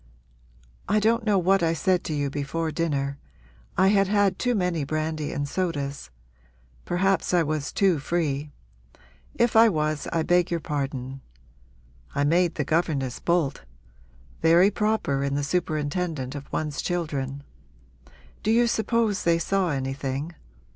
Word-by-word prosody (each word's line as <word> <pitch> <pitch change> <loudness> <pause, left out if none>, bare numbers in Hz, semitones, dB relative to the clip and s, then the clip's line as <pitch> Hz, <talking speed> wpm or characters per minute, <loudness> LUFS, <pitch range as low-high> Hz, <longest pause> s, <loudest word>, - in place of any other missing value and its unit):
I 210 +1 +3
don't 225 +2 +2
know 210 -2 +3
what 190 +1 +3
I 165 -1 +2
said 180 +1 +1
to 155 - -2
you 145 -1 -1
before 150 +3 -2
dinner 140 -4 -2 0.6
I 190 - +5
had 195 -1 +3
had 200 -2 +2
too 245 -1 +1
many 180 -6 0
brandy 155 +1 -2
and 145 0 -2
sodas. 145 - -3 0.8
Perhaps 185 0 +1
I 175 - +4
was 150 -2 -2
too 190 -6 +2
free; 150 -2 -1 0.9
if 235 -1 +2
I 225 +1 +8
was 155 -4 -1
I 165 -1 +1
beg 175 +2 +2
your 170 - -1
pardon. 135 -3 -4 0.9
I 140 - +1
made 170 +3 +2
the 150 - -1
governess 145 -5 0
bolt 170 -5 0 0.8
very 170 +5 +5
proper 210 -11 0
in 140 0 -1
the 145 - -1
superintendent 155 -2 -2
of 145 -1 -8
one's 150 -2 -2
children. 145 -6 -3 1.0
Do 215 - -2
you 235 +2 +4
suppose 225 -2 +1
they 170 -1 +3
saw 190 +2 0
anything? 135 +2 -3
165 Hz, 140 wpm, -25 LUFS, 145-185 Hz, 1.0 s, I